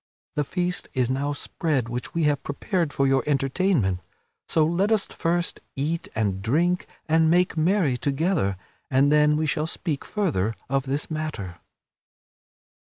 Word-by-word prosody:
the 150 - +1
feast 180 +4 -2
is 130 -1 +1
now 140 +2 0
spread 145 -3 -1
which 120 +5 -5
we 165 - +1
have 145 -2 +2
prepared 165 +2 -1
for 140 - +1
your 135 -1 +3
entertainment. 135 - +1 0.5
So 160 -2 +3
let 180 +6 +1
us 215 -3 +4
first 170 0 -1 0.2
eat 160 +5 -2
and 100 -4 0
drink 170 - +1 0.2
and 160 0 +4
make 180 +1 +3
merry 160 -5 +2
together, 140 - 0 0.3
and 135 +2 +4
then 150 0 +5
we 155 - +1
shall 155 +1 0
speak 160 -4 -3
further 125 - -1
of 135 0 0
this 140 +4 -2
matter." 115 - -4
150 Hz, 150 wpm, -25 LUFS, 135-170 Hz, 0.5 s, then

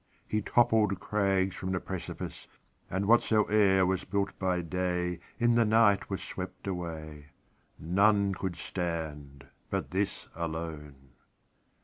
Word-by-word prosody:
He 110 - 0
toppled 110 -3 +3
crags 95 -2 +1
from 95 0 -3
the 90 - 0
precipice, 95 -1 -6 0.4
And 95 +2 -1
whatsoe'er 105 -3 +4
was 95 0 0
built 100 -1 -1
by 90 -2 0
dayIn 90 0 -1 0.3
the 115 0 +5
night 110 -2 +4
was - - -3
swept - - -7
away:None 85 +4 -1
could 95 -1 -3
stand 80 -6 -5 0.2
but - - -2
this 100 +2 -1
alone. 80 -5 -6
95 Hz, 110 wpm, -30 LUFS, 85-100 Hz, 0.4 s, the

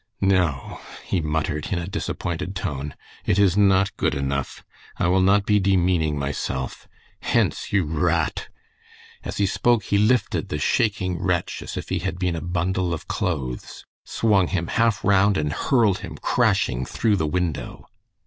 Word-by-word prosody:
"No!" 90 -8 +1 0.3
he 90 - 0
muttered, 75 -1 -2
in 95 - +1
a 85 - -3
disappointed 95 -2 -4
tone, 75 -5 -4 0.3
"it - - +1
is 100 -3 +4
not 100 -1 +3
good - - 0
enough. 70 0 -3 0.3
I - - 0
will 95 +1 +3
not 100 +2 +4
be 105 -1 +3
demeaning 90 -5 +2
myself. 70 -2 -4 0.3
Hence, - - 0
you 100 -2 +3
r 80 +1 -1
r - - +4
a 80 0 +2
a - - -2
t!" - - -6 0.8
As - - -5
he 100 - +2
spoke 120 +3 +2
he 100 0 +1
lifted 120 +4 +1
the 75 - -2
shaking 95 0 0
wretch 90 -3 -1
as - - -7
if - - -6
he - - 0
had 95 0 -3
been 90 -2 -1
a 80 - -4
bundle 90 +1 -1
of 75 - -11
clothes, 65 -9 -3 0.2
swung 100 -5 +2
him 85 -2 -2
half 115 -3 +1
round 100 +1 +4
and 75 -1 -1
hurled 110 - +2
him - - -8
crashing 60 0 +1
through 105 - 0
the 80 - 0
window. 85 -1 -3
90 Hz, 175 wpm, -23 LUFS, 80-100 Hz, 0.8 s, is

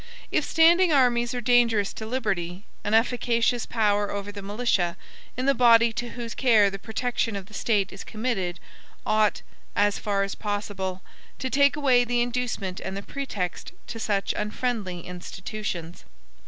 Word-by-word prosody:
If - - +2
standing 340 +2 +5
armies 245 -3 +3
are 245 - -2
dangerous 235 -4 +3
to 220 - -7
liberty, 200 -6 -2 0.2
an 210 +1 +1
efficacious 235 0 +1
power 205 -3 +1
over 200 0 -4
the 205 0 -8
militia, 195 -4 0 0.4
in 255 - -1
the 275 - +4
body 235 -2 +5
to 240 +1 -4
whose 235 -2 -5
care 220 -6 +4
the 195 - -6
protection 230 0 -2
of 195 -2 -5
the 210 - -18
State 205 -4 0
is 195 - -8
committed, 215 -6 -2 0.5
ought, 215 -1 +2 0.3
as 205 0 +2
far 200 -1 0
as 195 - -3
possible, 200 -3 -4 0.3
to 260 - -4
take 280 +1 +4
away 260 -4 +4
the 240 0 0
inducement 240 -6 -2
and 190 +1 -5
the 200 - -6
pretext 210 -11 -4
to 225 - -7
such 205 -3 0
unfriendly 210 -4 -2
institutions. 180 -1 -6
215 Hz, 155 wpm, -26 LUFS, 195-245 Hz, 0.5 s, standing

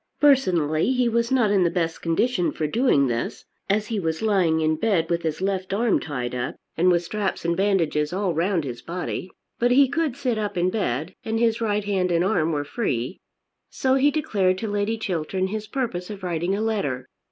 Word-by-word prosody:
Personally 185 - +3
he 250 -1 +2
was 235 +1 0
not 240 -6 +3
in 195 -3 +4
the 170 - +3
best 165 -2 -2
condition 180 +3 +1
for 155 - -3
doing 150 - +3
this 120 -2 -3 0.2
as 210 +2 +2
he 220 -1 -2
was 160 +1 -2
lying 185 -7 +2
in 155 0 +2
bed 170 -2 0
with 170 0 +1
his 160 +1 -3
left 190 0 -1
arm 230 +1 +2
tied 125 -5 -4
up, 125 0 -3 0.2
and 180 +3 +3
with 175 -1 +3
straps 195 0 -3
and 170 0 +1
bandages 170 -6 +1
all 190 -1 0
round 170 +1 +1
his 125 -4 -6
body. 180 +1 -4 0.3
But 245 - +3
he 270 +2 +6
could 295 -2 -1
sit 250 -6 -1
up 210 -3 -3
in 180 +1 +2
bed, 160 - -2
and 225 0 -1
his 230 -1 +2
right 210 -2 0
hand 190 -3 0
and 170 0 +2
arm 165 -6 +1
were 145 -2 -1
free. 145 - -2 0.5
So 260 0 0
he 270 +2 +4
declared 200 -11 +1
to 220 - -3
Lady 205 +2 -1
Chiltern 185 -1 -2
his 215 +1 -4
purpose 215 -10 -3
of 200 -2 -8
writing 175 +1 -1
a 205 - -2
letter. 145 - -1
190 Hz, 205 wpm, -24 LUFS, 165-220 Hz, 0.5 s, he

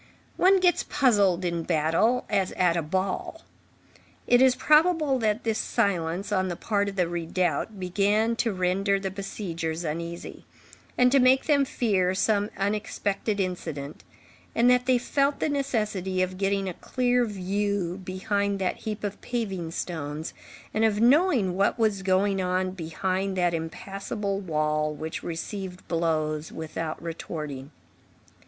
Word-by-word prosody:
One 380 +1 +5
gets 355 -2 +3
puzzled 205 -10 +2
in 170 -1 -1
battle, 165 +10 +1
as 195 -3 0
at 180 -2 +2
a 170 - +1
ball. 190 - -3 0.8
It 245 +1 +5
is 260 -1 +6
probable 305 -2 +3
that 215 0 0
this 225 -1 0
silence 180 0 -1
on 190 -2 +1
the 175 - -3
part 205 +1 0
of 195 - -8
the 180 -3 +1
redoubt 175 +3 -1
began 205 +5 +1
to 230 -1 +1
render 195 +1 +1
the 195 -1 -3
besiegers 175 -4 -4
uneasy, 170 +2 -5 0.5
and 250 0 +5
to 275 - +5
make 255 +1 +5
them 285 -3 +3
fear 190 -8 +1
some 205 +1 +1
unexpected 205 +1 -1
incident, 160 -6 -4 0.5
and 240 +2 +5
that 250 0 +2
they 255 -1 +5
felt 275 +3 0
the - - 0
necessity 210 -10 -1
of 185 0 -4
getting 195 0 0
a 185 - -3
clear 250 +5 +1
view 200 -3 -2
behind 200 +2 -1
that 190 -2 -1
heap 215 -1 -5
of 205 -1 -4
paving 195 -9 -3
stones, 160 -2 -4 0.4
and 220 - +1
of 215 -2 +2
knowing 250 - +4
what 195 +4 +2
was 215 -4 +1
going 190 +1 +2
on 185 0 0
behind 185 +2 -2
that 175 -1 +2
impassable 195 +4 -4
wall 155 -4 0
which 155 +2 -5
received 180 +2 -6
blows 155 -2 -1
without 160 0 -5
retorting. 150 -5 -6
195 Hz, 145 wpm, -26 LUFS, 170-220 Hz, 0.8 s, is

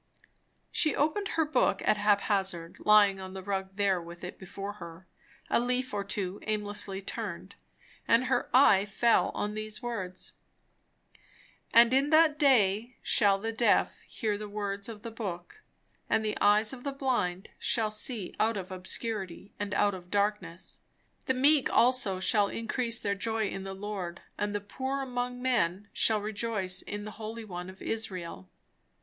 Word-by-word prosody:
She 310 - +1
opened 315 +8 0
her 320 - +3
book 305 - +1
at 210 - +3
hap 205 -1 +3
hazard, 190 -5 -1
lying 205 -2 +5
on 190 0 -8
the 190 - -6
rug 190 -1 -3
there 195 -3 +1
with 170 +1 -11
it 180 - -7
before 195 +2 -6
her. 170 +2 -10 0.4
A - - +2
leaf 250 +1 -1
or 200 -1 -1
two 195 -1 -4
aimlessly 205 -2 -1
turned, 195 -3 -6 0.5
and 230 +2 +4
her - - 0
eye 225 -7 +6
fell 230 +3 +2
on 210 0 -2
these 215 +2 -4
words: 190 -7 -3 1.4
"And 235 +1 +6
in 275 +2 +3
that 310 -1 +5
day 235 -4 +3
shall 200 -2 +4
the 225 +3 -3
deaf 225 -1 +3
hear 210 -2 -2
the 210 -1 -6
words 200 0 -4
of 215 -2 -9
the 230 - -6
book, 205 - -6 0.5
and 220 0 +2
the 210 - -1
eyes 210 +3 +4
of 250 -2 -9
the 280 - -2
blind 240 -9 -1
shall 220 -2 +1
see 215 -2 -1
out 220 0 +2
of 190 -1 -6
obscurity 190 0 -4
and 205 0 -3
out 205 0 +3
of 180 -1 -9
darkness. 200 -4 -2 0.5
The 260 - +2
meek 280 +2 +4
also 240 -7 +4
shall 205 +1 +3
increase 230 +2 -2
their 200 - -1
joy 220 +1 -1
in 195 0 -6
the 195 0 -6
Lord, 195 -3 -5
and 205 0 -2
the 205 - -1
poor 265 +6 -3
among 250 -1 -4
men 205 -6 0
shall 215 -2 +3
rejoice 205 -3 -1
in 205 0 -6
the 215 - -6
Holy 220 +1 -6
One 180 -2 -6
of 190 - -12
Israel." 185 - -4
210 Hz, 165 wpm, -29 LUFS, 195-230 Hz, 1.4 s, eye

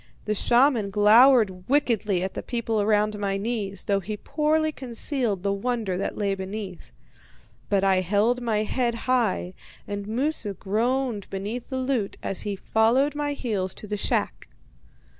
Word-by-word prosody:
The 215 - 0
shaman 240 0 +3
glowered 210 -2 +5
wickedly 220 -9 +1
at 190 - -3
the - - -4
people 230 -3 -1
around 210 0 +1
my 195 -1 -1
knees, 200 -3 -3
though 200 -1 +1
he 210 +3 -5
poorly 310 +5 0
concealed 240 -6 -2
the 200 0 +1
wonder 215 -2 -2
that 190 - -3
lay 200 -2 0
beneath. 190 -1 -7 0.8
But 200 -1 +2
I 195 -1 +4
held 210 +7 +1
my 220 -3 0
head 235 +2 -1
high, 230 -8 +1 0.3
and 205 0 -5
Moosu 230 -3 -2
groaned 230 +3 -1
beneath 205 +5 -5
the 260 - -3
loot 255 -6 -1
as 195 - +2
he 205 -1 -3
followed 235 +8 +2
my 290 0 -2
heels 205 -9 -2
to - - -9
the 210 0 -3
shack. 200 - -2
215 Hz, 155 wpm, -25 LUFS, 200-250 Hz, 0.8 s, glowered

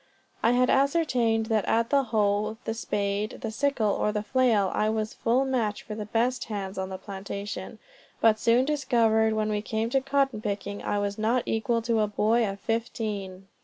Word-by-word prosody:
I 230 - +3
had 250 0 +3
ascertained 265 -6 +2
that 220 -2 +1
at 230 +1 +1
the 280 -2 +3
hoe, 215 -1 0
the 225 - -1
spade, 205 -1 -2
the 225 - -3
sickle, 250 -3 +1
or 210 - 0
the 210 0 -2
flail, 225 -6 +2
I 215 - +1
was 220 0 -2
a - - -21
full 245 +4 +1
match 235 -6 -1
for 215 - -7
the 210 -1 -5
best 240 +4 0
hands 195 -3 -5
on 190 0 -3
the 190 - -5
plantation; 200 +1 -6 0.4
but 220 -1 +4
soon 235 +3 +3
discovered 235 -6 +2
when 215 0 0
we 210 -1 -1
came 220 +2 -2
to 270 - +2
cotton 270 -4 0
picking 200 -1 -4
I 205 - -1
was 205 0 -2
not 230 +3 +1
equal 225 +1 0
to 230 -1 +1
a 210 - +2
boy 215 +2 +2
of 195 0 -6
fifteen. 210 -5 -3
220 Hz, 195 wpm, -27 LUFS, 210-240 Hz, 0.4 s, but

